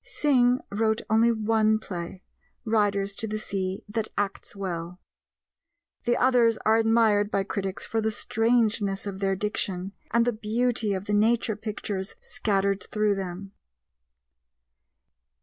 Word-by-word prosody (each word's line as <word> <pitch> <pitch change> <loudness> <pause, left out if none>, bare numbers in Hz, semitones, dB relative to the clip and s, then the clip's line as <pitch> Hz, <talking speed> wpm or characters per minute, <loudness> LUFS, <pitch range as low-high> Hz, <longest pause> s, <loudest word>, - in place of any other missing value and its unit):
Synge 260 - +2
wrote 220 +1 0
only 225 +2 +5
one 220 -1 +2
play 180 -3 -7 0.4
Riders 205 -3 +1
to 220 - -1
the 215 0 -3
Sea 195 -2 -3
that 215 +1 -3
acts 205 0 -3
well. 180 -2 -5 1.1
The 240 +1 +2
others 245 -3 +4
are 220 +1 +5
admired 225 -2 +3
by 195 -2 0
critics 195 -1 -4
for 225 - -1
the 220 0 0
strangeness 220 -3 +1
of 195 -1 -5
their 195 -1 +1
diction 195 -2 -2 0.2
and 235 +1 +3
the 245 - +1
beauty 220 0 0
of 190 +1 -5
the 210 - -2
nature 220 +1 +2
pictures 205 -2 -4
scattered 200 -4 0
through 210 -1 +1
them. 195 0 -5
210 Hz, 130 wpm, -26 LUFS, 195-225 Hz, 1.1 s, only